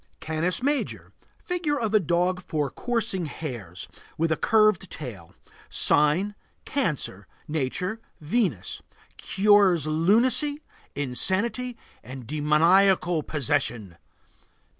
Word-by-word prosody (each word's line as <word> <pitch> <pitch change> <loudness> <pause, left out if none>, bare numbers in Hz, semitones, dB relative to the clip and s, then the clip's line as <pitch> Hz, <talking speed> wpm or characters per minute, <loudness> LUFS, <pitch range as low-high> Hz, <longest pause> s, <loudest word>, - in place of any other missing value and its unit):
CANIS 165 +8 -2
MAJOR. 285 +1 -1 0.3
Figure 335 -5 -1
of 220 -2 -2
a 215 - +6
dog 180 +1 0
for 150 -6 -2
coursing 225 -8 -2
hares, 120 - -7 0.3
with 165 +1 0
a - - +3
curved 215 -2 +3
tail. 105 - -9 0.3
Sign: 155 +8 +3 0.3
Cancer. 150 - -2 0.2
Nature: 160 +8 -2 0.2
Venus. 155 - -1 0.4
Cures 195 -5 +3
lunacy, 235 - +2 0.3
insanity, 200 - -1 0.3
and 130 -1 -9
demoniacal 165 - +3
possession. 120 - -2
175 Hz, 95 wpm, -25 LUFS, 150-215 Hz, 0.4 s, a